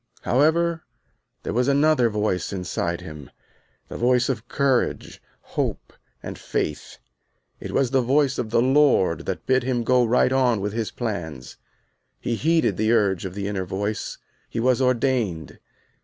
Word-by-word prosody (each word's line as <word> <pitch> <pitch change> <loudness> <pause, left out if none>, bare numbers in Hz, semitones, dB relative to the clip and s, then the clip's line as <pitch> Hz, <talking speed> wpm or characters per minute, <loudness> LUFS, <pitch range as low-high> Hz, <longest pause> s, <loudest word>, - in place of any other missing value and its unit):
However 160 +5 +2 0.6
there - - -3
was 125 +3 +1
another 140 -3 +3
voice 105 -3 -1
inside 90 -2 -3
him, 75 -4 -10 0.6
the - - -7
voice 125 +1 +2
of 120 -4 -3
courage, 135 -3 0 0.3
hope - - -3 0.3
and - - -7
faith. 75 - -3 0.6
It - - -7
was 130 -3 +1
the 135 -1 +3
voice 135 +2 +2
of 115 - -2
the 115 +1 +2
Lord 130 - +3
that - - -4
bid 130 0 +3
him 125 -1 -1
go 125 +1 +3
right 125 +2 +3
on 125 -4 +2
with 100 +1 -3
his 115 -1 -2
plans. 80 - -5 0.6
He 120 - -2
heeded 155 - +1
the 110 +1 +1
urge 100 -6 +2
of 95 -1 -6
the 100 -1 -3
inner 100 -2 -2
voice. 100 +4 -3 0.3
He - - -4
was 125 +2 +2
ordained. 120 - 0
120 Hz, 155 wpm, -23 LUFS, 100-130 Hz, 0.6 s, another